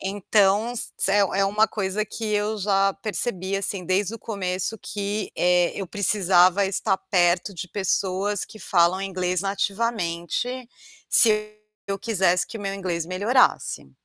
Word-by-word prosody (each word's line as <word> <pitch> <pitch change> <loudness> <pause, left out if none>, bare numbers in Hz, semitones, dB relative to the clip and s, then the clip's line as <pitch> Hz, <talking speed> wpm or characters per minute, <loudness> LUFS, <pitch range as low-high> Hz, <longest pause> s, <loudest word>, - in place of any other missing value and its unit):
Então, 205 +3 +1
se 195 - -1
é 205 - +3 0.2
é - - +4
uma 210 +3 +3
coisa 205 0 -2
que 225 - -7
eu 210 +1 0
já 195 0 +2
percebi 195 -3 -2
assim, 195 -1 -3
desde 195 +4 0
o - - -8
começo 195 0 -3
que, 205 +2 -4
eh, 180 0 +3
eu 195 - -4
precisava 190 -1 +3
estar 195 0 0
perto 175 +1 +1
de 180 +1 -6
pessoas 195 +1 -1
que 215 - -14
falam 175 +1 +2
inglês 185 -2 -1
nativamente, 200 +3 -2 0.4
se 215 -2 +4 0.4
eu 195 - -2
quisesse 190 -5 +1
que 225 - -8
o - - -8
meu 195 -1 -3
inglês 180 -4 -3
melhorasse, 200 - +1
195 Hz, 145 wpm, -24 LUFS, 185-210 Hz, 0.4 s, é